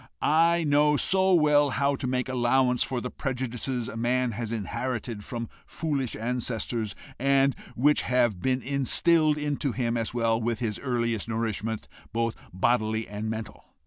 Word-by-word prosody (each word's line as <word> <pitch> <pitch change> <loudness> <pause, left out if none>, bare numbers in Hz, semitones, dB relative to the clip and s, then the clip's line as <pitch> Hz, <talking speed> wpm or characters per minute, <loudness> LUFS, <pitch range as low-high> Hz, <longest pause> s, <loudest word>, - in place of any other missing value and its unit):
I 165 +2 +3
know 150 0 +3
so 190 +3 +3
well 150 -3 +4
how 140 +2 +2
to 130 - -3
make 125 0 -1
allowance 125 0 +2
for 125 -2 0
the 125 - -5
prejudices 125 -2 -3
a - - -7
man 125 +2 +1
has 115 +1 -4
inherited 115 0 -3
from 115 0 -5 0.2
foolish 140 -6 -2
ancestors, 115 -2 -2 0.2
and 135 0 +3 0.2
which 145 +5 +3
have 120 -7 +1
been 130 +2 0
instilled 150 +3 +2
into 145 -3 -1
him, 120 -1 -1
as 115 -1 -2
well, 115 -1 +1
with 115 0 -1
his 110 -3 -3
earliest 115 -4 -1
nourishment, 110 -1 -2 0.2
both 115 0 -1 0.2
bodily 110 +3 +1
and 105 +1 -4
mental. 110 -1 -6
125 Hz, 150 wpm, -27 LUFS, 115-140 Hz, 0.2 s, well